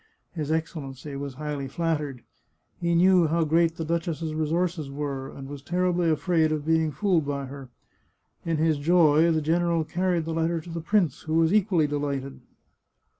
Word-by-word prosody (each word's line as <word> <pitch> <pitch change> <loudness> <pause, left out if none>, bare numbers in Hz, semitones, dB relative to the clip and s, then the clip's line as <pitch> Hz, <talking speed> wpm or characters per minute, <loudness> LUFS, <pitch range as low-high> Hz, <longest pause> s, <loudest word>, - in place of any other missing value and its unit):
His 155 -3 -3
Excellency 150 -3 -4
was 140 -1 -5
highly 145 -1 -4
flattered. 150 -4 -2 0.6
He 170 -1 +1
know 180 -1 +5
how 165 +2 +1
great 165 +1 +2
the 165 - -4
duchess's 165 -1 -2
resources 160 0 -1
were, 140 -1 -4
and 135 -1 -9
was 140 0 -8
terribly 175 +2 +1
afraid 160 0 +2
of 150 -1 -2
being 160 -1 +2
fooled 180 -1 +1
by 140 -1 -2
her. 135 -1 -9 0.7
In 165 -1 -1
his 155 -1 +2
joy 160 0 +4
the 160 -2 +1
general 170 +1 +1
carried 175 0 -1
the 165 - -3
letter 165 +1 0
to 165 +2 -10
the 165 0 -4
prince, 180 -4 +1
who 155 0 -3
was 165 +2 +3
equally 190 -6 +3
delighted. 140 -2 -3
160 Hz, 170 wpm, -26 LUFS, 145-170 Hz, 0.7 s, know